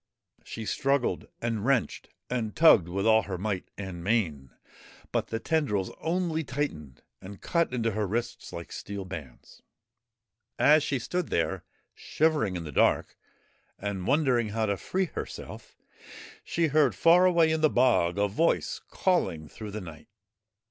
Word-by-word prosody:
She 110 - -7
struggled 135 +2 0 0.2
and 115 -3 -1
wrenched 130 0 0 0.2
and 115 -4 -3
tugged 110 - +6
with 95 +2 -2
all 110 0 +5
her 95 -3 -5
might 95 0 -3
and 95 -4 -6
main, 85 - 0 0.6
but - - -1
the 115 - -3
tendrils 115 -10 0
only 165 -1 -1
tightened 125 - -4 0.2
and 95 +1 -10
cut 170 -4 0
into 115 -2 0
her 105 0 -1
wrists 115 +5 -4
like 85 0 -8
steel 100 -1 -6
bands. 75 -10 -10 1.0
As 150 +1 +5
she 140 -1 -1
stood 175 +8 -3
there - - -1 0.3
shivering 150 -12 0
in 85 - -4
the 75 - -7
dark - - +2 0.6
and 100 -2 -4
wondering 130 -6 +2
how 110 +1 -1
to 100 -1 0
free 190 - -1
herself, - - -8 0.7
she 170 - 0
heard 145 -3 +3
far 175 +2 +5
away 170 -3 +4
in 160 0 0
the 155 - +5
bog 120 -10 +2
a 100 0 +2
voice 160 +12 0
calling 85 - 0
through 105 +7 -9
the 105 +1 -5
night. 80 -5 -11
115 Hz, 150 wpm, -28 LUFS, 95-150 Hz, 1.0 s, tugged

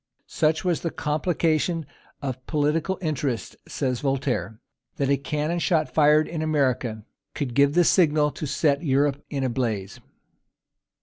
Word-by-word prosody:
"Such 160 +3 0
was 175 -3 +1
the 165 - -1
complication 160 +1 0 0.4
of 130 -2 -4
political 155 +4 0
interests," 140 -6 -2
says 130 -4 -2
Voltaire, 135 -5 -2 0.4
"that 140 -1 0
a - - +5
cannon 150 +4 -2
shot 160 -2 +1
fired 150 0 +4
in 165 -2 -4
America 130 -8 0 0.3
could 135 -5 -3
give 140 +3 +3
the 175 - +5
signal 155 -4 +3
that 150 +2 -5
set 140 0 +1
Europe 140 -1 +1
in 140 -2 -2
a 130 - +1
blaze." 110 -6 -3
145 Hz, 140 wpm, -25 LUFS, 135-155 Hz, 0.4 s, a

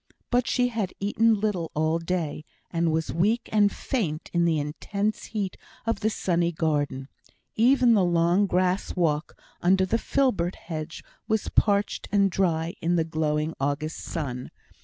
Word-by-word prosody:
But 245 0 +2
she 250 -1 +2
had 220 -6 -2
eaten 220 +2 +2
little 195 -6 -1
all 160 +2 +1
day, 165 -3 -2 0.3
and 170 -1 +1
was 160 0 -1
weak 215 +8 +1
and 205 -1 +4
faint 175 - -3
in 170 0 +3
the 165 -2 +2
intense 200 +8 -2
heat 205 -4 -3 0.3
of 230 - 0
the 220 - +1
sunny 175 -5 0
garden. 145 -5 -1 0.5
Even 245 +1 +5
the 205 -4 +4
long 175 +3 +3
grass 185 +1 0
walk 160 -4 0 0.2
under 190 +2 +4
the 230 +5 0
filbert 200 -13 +1
hedge, 155 -2 -6 0.2
was 220 -2 0
parched 205 0 +1
and 200 -1 +3
dry 170 -3 0
in 170 +2 +1
the 165 - +2
glowing 155 -1 -1
August 145 +3 -2
sun. 125 -6 -4
175 Hz, 155 wpm, -26 LUFS, 160-210 Hz, 0.5 s, Even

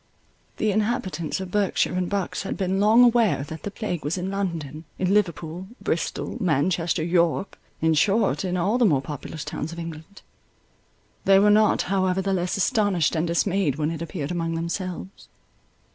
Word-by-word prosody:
The 215 - +1
inhabitants 210 -6 -1
of 190 -1 -6
Berkshire 205 -3 +1
and 180 -1 -1
Bucks 200 -2 -2
had 195 - -4
been 190 0 0
long 220 +4 +6
aware 230 - +3
that 160 +2 -8
the - - -4
plague 200 -5 -4
was 150 +6 -1
in 185 +2 -3
London, 165 -6 -3
in 185 +1 +1
Liverpool, 175 -3 -1
Bristol, - - -2
Manchester, 170 +1 +1
York, 170 +2 +1 0.2
in 160 0 +3
short, 200 +8 +2
in 180 -1 -1
all 200 +8 +1
the 245 - +5
more 145 -9 +3
populous 150 +2 -7
towns 155 - -4
of 170 - -8
England. 165 +3 -8 1.0
They 195 0 +6
were 205 +1 +5
not 215 0 +4
however 190 -1 +1
the 195 0 0
less 180 0 -1
astonished 195 - +2
and 160 +2 0
dismayed 170 -3 +1
when 155 +1 -1
it 165 -1 -5
appeared 160 -3 -4
among 165 -1 -2
themselves. 180 +3 -5
180 Hz, 170 wpm, -24 LUFS, 165-200 Hz, 1.0 s, long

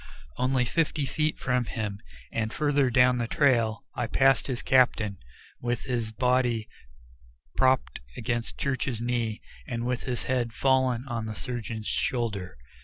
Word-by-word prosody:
Only 130 0 +1
fifty 150 +2 0
feet 155 +2 0
from 125 -1 0
him 105 -3 -4 0.3
and 110 -1 -1
farther 145 -2 +2
down 125 0 +4
the 120 - -1
trail 115 -5 +2
I 120 - -2
passed 135 +2 +3
his 130 -3 -3
captain, 110 -6 +3 0.4
with 120 -1 -1
his 120 -4 -2
body 125 -1 +1 0.9
propped 130 - +2 0.2
against 120 0 -2
Church's 130 -3 -1
knee 115 -2 -1 0.2
and 115 0 -3
with 125 0 -2
his 125 -2 -2
head 125 -3 -1
fallen 130 0 +2
on 115 -3 -3
the 110 - -5
surgeon's 115 -2 -4
shoulder. 105 - -2
120 Hz, 140 wpm, -27 LUFS, 115-130 Hz, 0.9 s, down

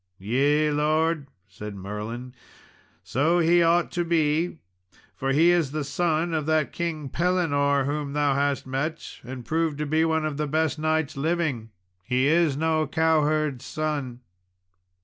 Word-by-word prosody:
"Yea, 140 +9 +2
lord," 155 0 +1 0.2
said 100 +2 -8
Merlin, 105 +6 -6 0.7
"so 145 - +1
he 175 +1 +4
ought 170 +1 +3
to 175 - -1
be, 165 0 +1 0.6
for 135 0 -1
he 165 +5 +5
is 170 -5 +2
the 150 +1 -3
son 165 +3 0
of 155 -2 -1
that 155 -2 +1
King 165 -4 -3
Pellinore 145 -4 +1
whom 145 0 -3
thou 145 -1 +2
hast 140 0 0
met, 140 +5 -4
and 125 -1 -8
proved 160 0 0
to 150 - -2
be 155 +2 +2
one 160 -1 +1
of 150 -2 -3
the 150 0 -1
best 155 +1 0
knights 155 0 0
living. 145 -6 -1 0.3
He 125 +4 +1
is 155 -2 +3
no 160 -1 +1
cowherd's 155 -3 +1
son." 145 -6 -3
150 Hz, 150 wpm, -25 LUFS, 140-160 Hz, 0.7 s, he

